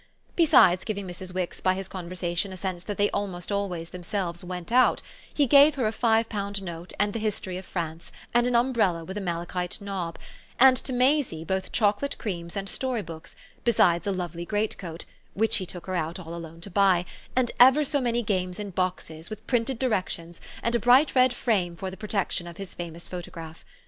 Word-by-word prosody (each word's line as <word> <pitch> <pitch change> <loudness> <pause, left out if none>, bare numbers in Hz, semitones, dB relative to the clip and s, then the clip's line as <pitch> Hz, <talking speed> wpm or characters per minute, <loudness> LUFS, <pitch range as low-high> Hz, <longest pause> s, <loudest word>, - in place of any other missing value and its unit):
Besides 285 - +6
giving 200 -3 -3
Mrs. 180 +1 -7
Wix 180 -1 -3
by 185 0 +2
his 190 -1 -5
conversation 180 0 -3
a 185 - -7
sense 185 -2 -4
that 205 - -4
they 205 0 +2
almost 190 -3 -3
themselves 180 -2 -3
"went 180 +1 -6
out," 255 +1 +4 0.3
he 290 - +2
gave 285 +3 +7
her 260 -5 0
a 215 - +2
five 225 0 +2
pound 200 -2 -3
note 170 -1 -7
and 205 0 +1
the 230 - -2
history 210 -4 -3
of 185 +1 -7
France 165 -2 -5 0.2
and 240 +1 +4
an 245 - +1
umbrella 230 -9 +2
with 190 - -7
a 210 - -3
malachite 175 0 -2
knob, 195 -5 -4 0.4
and 260 +1 +8
to 265 - -4
Maisie 255 - +2
both 190 +3 -2
chocolate 215 +5 +1
creams 170 -3 -4
and 195 0 -3
story 250 -1 -1
books, 160 -1 -9 0.3
besides 190 -5 +3
a - - +2
lovely 175 -2 -4
greatcoat 190 -4 -3 0.3
(which 225 +2 +2
he 185 -3 -4
took 175 0 -7
her 185 - -4
out 165 -1 -2
all 170 -3 -8
alone 165 -1 -8
to 200 - -9
buy) 185 -2 +4 0.3
and 250 -2 +2
ever 265 +5 +7
so 285 0 +1
many 240 -1 0
games 185 -2 -1
in 205 -1 -5
boxes, 175 -3 -3
with 215 0 -8
printed 245 +1 0
directions, 185 -8 -2 0.2
and 235 - 0
a 235 - +3
bright 250 +6 +5
red 255 -1 +5
frame 195 -8 0
for 190 +2 -5
the - - -8
protection 200 -4 -2
of 170 -1 -9
his 195 -2 -7
famous 170 -1 -7
photograph. 165 -2 -8
190 Hz, 195 wpm, -26 LUFS, 175-225 Hz, 0.4 s, and